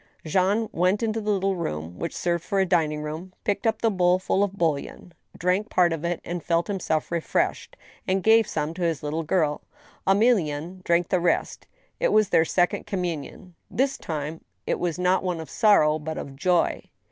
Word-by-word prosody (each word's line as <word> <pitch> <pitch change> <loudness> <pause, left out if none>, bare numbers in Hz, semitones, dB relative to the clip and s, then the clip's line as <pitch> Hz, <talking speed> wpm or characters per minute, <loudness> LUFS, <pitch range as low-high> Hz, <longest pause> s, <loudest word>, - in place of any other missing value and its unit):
Jean 195 +7 +1
went 185 +6 +1
into 225 0 -1
the 210 - -3
little 195 -1 +1
room 85 - -5
which 170 - -4
served 170 -1 -1
for 200 - -1
a 190 - +3
dining 155 -4 +1
room, 160 +5 -6
picked 205 +2 0
up 225 - -1
the 225 - +4
bowl 180 -2 +3
full 190 +1 +1
of 200 -1 -1
bouillon, 165 +1 -2 0.2
drank 185 +5 0
part 175 -2 +3
of 160 -1 -5
it, 170 0 -3 0.2
felt 170 +1 +1
himself 175 -6 -2
re 170 - +1
freshed, - - -2 0.3
and 190 0 +1
gave 225 -1 +5
some 155 -5 -2
to 180 - -8
his 165 -4 -1
little 150 +2 -2
girl; 155 -2 0 0.5
Emelienne 185 -5 +1
drank 170 0 +1
the 185 - +2
rest. 175 - -1 0.3
It - - +2
was 215 -2 +4
their 160 - +4
second 175 +2 0
communion. 180 -1 -4 0.2
This 270 +3 0
time 155 0 -5 0.2
it - - -1
was 175 -2 -1
one 180 - -3
not 185 +1 +3 0.2
of 160 -4 -8
sorrow, 155 -9 +4
but 160 +1 -5
of 135 - -7
joy. 180 +4 +1
175 Hz, 190 wpm, -25 LUFS, 160-195 Hz, 0.5 s, gave